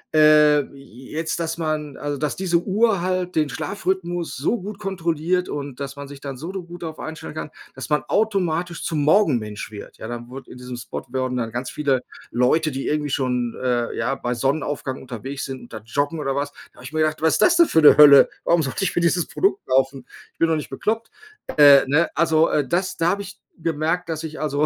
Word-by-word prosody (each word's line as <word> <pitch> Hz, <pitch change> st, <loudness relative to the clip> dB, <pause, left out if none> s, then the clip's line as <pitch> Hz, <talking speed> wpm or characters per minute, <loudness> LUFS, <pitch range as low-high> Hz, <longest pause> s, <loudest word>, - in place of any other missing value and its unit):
äh, 150 Hz, -1 st, +6 dB
jetzt, 135 Hz, +5 st, -6 dB
dass 165 Hz, 0 st, -3 dB
man 155 Hz, -3 st, -2 dB
also, 145 Hz, -1 st, -3 dB
dass 150 Hz, 0 st, -2 dB
diese 180 Hz, -2 st, +1 dB
Uhr 210 Hz, -1 st, +2 dB
halt 180 Hz, 0 st, -2 dB
den 155 Hz, -2 st, +2 dB
Schlafrhythmus 175 Hz, +3 st, -3 dB
so 155 Hz, -, 0 dB
gut 200 Hz, +2 st, -7 dB
kontrolliert 180 Hz, -1 st, -1 dB
und 140 Hz, -3 st, -6 dB
dass 140 Hz, 0 st, -5 dB
man 140 Hz, 0 st, -8 dB
sich 140 Hz, 0 st, -11 dB
dann 135 Hz, -2 st, -6 dB
so 165 Hz, +8 st, -6 dB
do 190 Hz, -1 st, -5 dB
gut 175 Hz, 0 st, -11 dB
darauf 160 Hz, -2 st, -6 dB
einstellen 160 Hz, -1 st, -7 dB
kann, 155 Hz, -, -5 dB, 0.2 s
dass -, -, -6 dB
man 150 Hz, -, +3 dB
automatisch 175 Hz, -4 st, 0 dB
zum 150 Hz, -3 st, -1 dB
Morgenmensch 130 Hz, -, +2 dB
wird. 105 Hz, -2 st, -10 dB
Ja, -, -, -6 dB
dann 120 Hz, 0 st, -6 dB
wurde 135 Hz, +2 st, -10 dB
in -, -, -11 dB
diesem 125 Hz, 0 st, -7 dB
Spot 120 Hz, -, -6 dB
wurden 130 Hz, 0 st, -2 dB
dann 115 Hz, -2 st, -2 dB
ganz 125 Hz, +2 st, -4 dB
viele 140 Hz, -4 st, 0 dB, 0.3 s
Leute, 155 Hz, +6 st, +2 dB
die 135 Hz, 0 st, -4 dB
irgendwie 150 Hz, -1 st, -1 dB
schon, 125 Hz, -3 st, -1 dB
äh, 120 Hz, -2 st, 0 dB
ja, 120 Hz, +4 st, -1 dB
bei 120 Hz, -2 st, -3 dB
Sonnenaufgang 135 Hz, +1 st, -2 dB
unterwegs 130 Hz, +2 st, -6 dB
sind 130 Hz, -1 st, -7 dB
und 120 Hz, -, -14 dB
da 110 Hz, -, -6 dB
joggen 145 Hz, +7 st, -1 dB
oder 135 Hz, -2 st, -2 dB
was. 140 Hz, 0 st, -2 dB, 0.2 s
Da -, -, -27 dB
habe -, -, -14 dB
ich 140 Hz, -, -9 dB
mir 155 Hz, -, +1 dB
gedacht: 155 Hz, 0 st, 0 dB
„Was 160 Hz, 0 st, +3 dB
ist -, -, +2 dB
das 350 Hz, -1 st, +5 dB
denn 340 Hz, -1 st, +6 dB
für 160 Hz, -, +3 dB
'ne 150 Hz, -, +9 dB
Hölle? 145 Hz, -2 st, +9 dB, 0.2 s
Warum 170 Hz, -1 st, +3 dB
sollte 135 Hz, +7 st, -3 dB
ich 190 Hz, -, -1 dB
mir 175 Hz, -, +1 dB
dieses 170 Hz, 0 st, +2 dB
Produkt 390 Hz, +1 st, 0 dB
kaufen? 135 Hz, 0 st, +1 dB, 0.3 s
Ich -, -, -45 dB
bin 165 Hz, -, +4 dB
doch 165 Hz, -, +2 dB
nicht 150 Hz, -, -4 dB
bekloppt.“ 220 Hz, +11 st, -2 dB, 0.5 s
Äh, 145 Hz, -2 st, +8 dB
ne, 150 Hz, +5 st, +2 dB
also, 160 Hz, 0 st, +3 dB
äh, 145 Hz, -3 st, 0 dB
das 185 Hz, +6 st, -1 dB
da 165 Hz, +1 st, +2 dB
habe 200 Hz, +3 st, 0 dB
ich 200 Hz, 0 st, -10 dB, 0.2 s
gemerkt, 165 Hz, +2 st, -1 dB
dass 160 Hz, -1 st, -3 dB
ich 155 Hz, -1 st, -7 dB
also, 150 Hz, 0 st, +1 dB
150 Hz, 225 wpm, -22 LUFS, 135-170 Hz, 0.5 s, ne